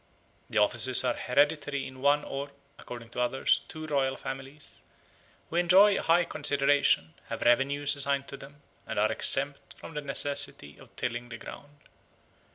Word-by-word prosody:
The - - -3
offices 120 +5 +4
are 125 -1 +1
hereditary 145 +2 0
in 130 -1 -10
one 145 +1 +3
or 140 +1 -5 0.3
(according 120 -1 -10
to 125 - -3
others) 130 +2 +1
two 155 0 -8
royal 135 -3 0
families, 135 +2 -9 0.7
who 165 - -2
enjoy 190 +4 +5
high 170 +1 +3
consideration, 145 - +1
have - - -5
revenues 140 +4 +3
assigned 140 0 0
to 140 - -7
them, 145 +2 -14 0.2
and - - -5
are 105 +1 +2
exempt 140 +5 -1
from - - -11
the 150 - -4
necessity 140 - -2
of - - -18
tilling 120 0 -4
the 120 - -7
ground. 145 +5 -12
140 Hz, 155 wpm, -28 LUFS, 125-145 Hz, 0.7 s, enjoy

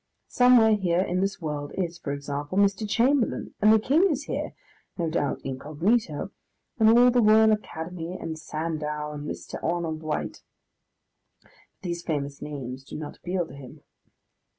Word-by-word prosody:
Somewhere 245 -3 +6
here 180 -4 +1
in 180 -1 0
this 195 +1 -1
world 150 -3 -4
is, 175 -3 -3
for 145 - -4
example, 145 +4 -4
Mr. 200 +1 +2
Chamberlain, 245 +3 +1
and 215 +1 +6
the 220 - +7
King 310 - +3
is 295 -3 -1
here - - -4 0.4
(no 165 -3 -1
doubt 145 -3 -1
incognito), 155 - -1 0.5
and 220 0 +6
all 245 +1 +7
the 245 0 +3
Royal 220 0 +6
Academy, 175 -3 -4
and 160 - -4
Sandow, 150 -1 -3
and 150 0 -6
Mr. - - -7
Arnold 165 -2 -1
White. 155 -1 -3 1.0
But - - -26 0.3
these 170 -2 -3
famous 145 -4 -3
names 135 -3 -6
do - - -8
not 150 -1 -7
appeal 180 0 -2
to 145 - -13
him. 135 -2 -12
170 Hz, 155 wpm, -26 LUFS, 150-215 Hz, 1.0 s, the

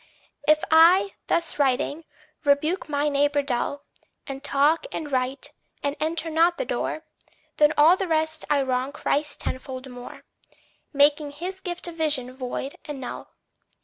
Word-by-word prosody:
If 305 0 +4
I, 355 +5 +6
thus 335 -2 -1
writing, 285 +3 +1 0.4
rebuke 305 +4 +1
my 290 0 0
neighbour 285 0 +2
dull, 280 +2 -2 0.4
And 275 0 -7
talk, 290 - +2
and 300 -3 -5
write, 260 +1 -1 0.3
and 285 0 -1
enter 325 +1 -2
not 335 +2 +3
the - - -2
door, 315 - -3 0.5
Than 300 0 +5
all 310 +4 +7
the 380 0 -3
rest 315 -1 0
I 285 -2 +3
wrong 260 +1 -1
Christ 295 0 -1
tenfold 260 0 -5
more, 245 0 -10 0.7
Making 290 +1 +4
his 360 +6 -6
gift 355 -2 -3
of 335 -1 -8
vision 285 -6 0
void 260 +1 -5
and 295 -2 -6
null. 255 - -8
295 Hz, 145 wpm, -25 LUFS, 275-320 Hz, 0.7 s, all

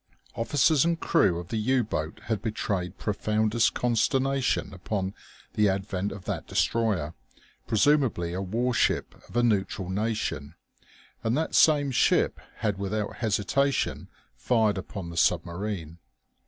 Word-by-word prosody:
Officers 140 +4 +3
and 170 0 +1
crew 95 - +3
of 85 0 -7
the 115 - -2
U 125 +3 +2
boat 80 -7 -4
had 110 -3 -2
betrayed 100 -5 -2
profoundest 110 +2 +1
consternation 130 0 +1
upon 95 +1 -3 0.4
the 105 -1 +3
advent 95 0 -2
of 95 -3 -9
that - - -4
destroyer, 105 -9 0 0.5
presumably 115 - +2
a 95 - -2
warship 115 +6 0 0.2
of - - -5
a 120 - +4
neutral 100 -4 0
nation. 100 -7 -2 0.7
And 115 +4 +1
that 160 - -1
same 145 -3 +5
ship 125 - +2 0.2
had 100 -2 -2
without 105 +1 -3
hesitation 115 +5 0 0.3
fired 110 -5 +1
upon 95 -2 -7
the 85 - -8
submarine. 85 -1 -1
105 Hz, 130 wpm, -27 LUFS, 95-120 Hz, 0.7 s, same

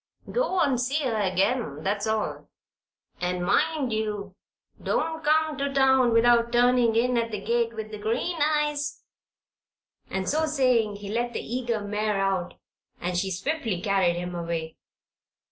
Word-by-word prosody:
Go 480 -7 0
and 260 -4 +2
see 280 +5 0
her 245 -4 0
again 190 - 0
that's 205 +3 -1
all. 220 -1 -2 0.7
And 180 0 -1
mind 275 - +1
you 210 -3 -3 0.5
don't 320 +1 -1
come 310 0 +2
to 280 0 -1
town 265 -2 +4
without 235 0 +4
turning 245 -1 +4
in 240 +1 +2
at 230 0 -1
the 210 -2 -4
gate 230 +2 0
with 220 0 -6
the 215 - -7
green 235 +11 -1
eyes;" 295 -1 0 1.1
and 190 -1 -3
so 315 +2 +1
saying 250 -8 +2
he 200 0 -8
let 240 +2 -1
the - - -3
eager 235 -2 -2
mare 210 0 -1
out 190 -2 -1 0.4
and 180 +1 -3
she 190 +2 0
swiftly 220 - -2
carried 190 -3 +2
him 180 +1 -4
away. 165 -2 -4
230 Hz, 150 wpm, -26 LUFS, 200-265 Hz, 1.1 s, town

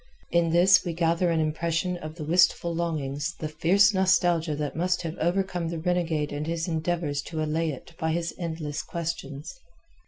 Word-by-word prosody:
In 170 -1 +3
this 180 +3 +5
we 175 -3 -3
gather 170 +1 +1
an 165 -1 +1
impression 165 +3 0
of 155 -2 -8
the 165 - -6
wistful 170 +1 +3
longings 160 -1 -2
the 155 - -3
fierce 180 +7 +4
nostalgia 175 -4 +2
that 145 -1 -3
must 180 +2 0
have 165 0 -4
overcome 175 0 0
the 170 - -4
renegade 160 -3 -1
and 150 +1 -3
his 165 +1 -2
endeavours 160 -3 -1
to 155 +1 -4
allay 160 +1 0
it 145 +2 -8
by 160 -2 0
his 170 +1 -2
endless 160 -4 -3
questions. 165 - -5
165 Hz, 175 wpm, -26 LUFS, 155-175 Hz, -, this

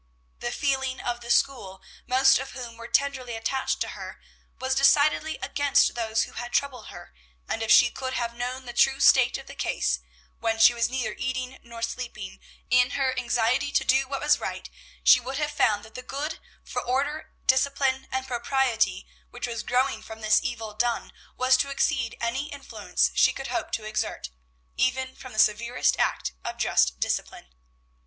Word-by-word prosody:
The 240 - -3
feeling 265 -1 -1
of 240 0 -3
the 235 - -10
school, 240 -8 +1 0.3
most 265 +1 +5
of 270 - -7
whom 245 -3 -7
were 230 0 -9
tenderly 260 -4 0
attached 260 +4 -1
to - - -1
her, - - -8 0.4
was 260 0 -1
decidedly 290 +3 +3
against 285 -1 +2
those 225 -2 0
who - - -8
had 240 0 -6
troubled 255 -6 -1
her; 175 0 -11 0.3
and 225 - -3
if 225 - -2
she 245 - +7
could 260 -1 -5
have 235 -1 -2
known 250 +2 -4
the 240 - -7
true 270 +3 +3
state 260 -2 +5
of - - -11
the - - -10
case, 60 0 -1 0.4
when 225 -1 0
she 225 +2 +7
was 235 -1 0
neither 260 -1 -2
eating 255 0 -4
nor 235 -1 -9
sleeping, 230 -5 -5 0.3
in 250 0 +5
her 265 -2 +1
anxiety 245 +3 +1
to - - +3
do 265 +1 +3
what 275 0 -4
was 300 0 +3
right, - - -6 0.3
she - - +7
would 260 +2 -5
have 300 0 -1
found 215 -7 +1
that 220 - -15
the 255 - -7
good 285 +5 -5 0.2
for - - -4
order, 280 +5 -2
discipline, 265 0 +2
and 260 0 -2
propriety, 235 -6 0 0.2
which 245 - -5
was 230 -2 -4
growing 250 -1 0
from 220 0 -10
this 215 0 +4
evil 225 -3 -4
done, 235 +2 -1 0.2
was 255 +1 +4
to 280 - 0
exceed 270 -3 0
any 240 +5 -2
influence - - -1
she - - +4
could - - -6
hope - - -3
to 220 - -2
exert, 215 - -3 0.4
even 260 +1 0
from 255 - -11
the 215 - -10
severest 235 +4 +2
act - - 0
of - - -5
just 60 0 +2
discipline. 65 -1 -3
250 Hz, 180 wpm, -26 LUFS, 230-265 Hz, 0.4 s, she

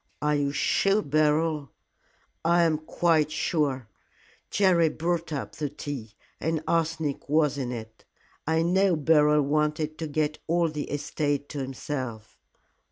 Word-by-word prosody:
"Are 150 0 +1
you 145 -1 +1
sure 195 +8 +2
Beryl 150 0 +1 0.4
" - - -39
"I 170 +1 +4
am 160 -2 +2
quite 155 -1 +2
sure. 145 - -1 0.6
Jerry 180 -5 +4
brought 170 +1 -2
up 145 -3 -5
the 150 -2 -2
tea, 135 -6 -7 0.3
and 160 -1 -1
arsenic 160 -4 -1
was 150 -2 +3
in 125 -2 -2
it. 110 -2 -8 0.4
I 160 0 +2
know 185 +1 +3
Beryl 150 -1 +4
wanted 150 +2 0
to 160 - -3
get 150 0 -1
all 170 0 +2
the 150 -1 -5
estate 145 0 -2
to 145 - -5
himself. 130 -4 -5
150 Hz, 140 wpm, -27 LUFS, 145-165 Hz, 0.6 s, I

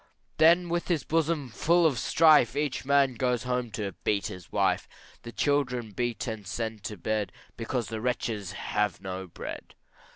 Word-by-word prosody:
Then 170 +3 +5
with 170 0 -1
his 165 -6 0
bosom 160 -4 0
full 170 +8 +3
of 140 -6 +2
strife, 150 -4 +5
Each 145 -2 -1
man 140 -1 +4
goes 125 0 0
home 125 -1 -1
to 100 -2 -3
beat 100 -2 +1
his 90 -4 -10
wife, - - +1 0.3
The 120 - -8
children 125 -5 0
beat 120 +1 -2
and 110 -5 -5
sent 110 +2 -4
to 105 - -5
bed, 105 0 -1 0.2
Because 115 0 -3
the 110 -1 -4
wretches 110 -5 -2
have 105 -1 -1
no 95 -1 -5
bread. 85 - -8
120 Hz, 165 wpm, -28 LUFS, 105-145 Hz, 0.3 s, Then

